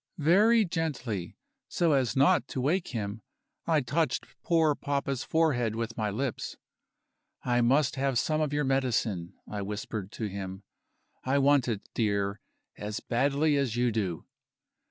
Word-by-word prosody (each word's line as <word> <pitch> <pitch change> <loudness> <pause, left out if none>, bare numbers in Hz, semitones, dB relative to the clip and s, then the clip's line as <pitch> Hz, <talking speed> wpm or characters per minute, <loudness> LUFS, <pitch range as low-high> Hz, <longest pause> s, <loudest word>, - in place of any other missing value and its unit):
Very 205 +8 +5
gently, 135 - -3 0.3
so 170 -2 +1
as 135 -4 +2
not 145 +7 +4
to - - -4
wake 165 +8 +1
him, 105 -2 -4 0.5
I 160 -3 +3
touched 140 +1 0 0.2
poor 160 -3 +3
papa's 140 -2 -2
forehead 125 -9 +1
with 115 0 -3
my 110 -2 -1
lips. 120 +5 -3 0.9
"I 120 -1 +2
must 135 +3 +3
have 135 -2 +1
some 155 +5 +1
of 150 -2 0
your 145 0 +1
medicine," 120 -10 0
I 105 -1 -4
whispered 105 0 -5
to - - -5
him; 95 -1 -6 0.6
"I 135 +2 +1
want 140 -2 +4
it, 110 -4 -3
dear, 100 -2 0 0.4
as 105 0 -4
badly 140 +5 +1
as 135 -5 0
you 120 0 +2
do." 95 -7 -2
130 Hz, 145 wpm, -29 LUFS, 110-145 Hz, 0.9 s, Very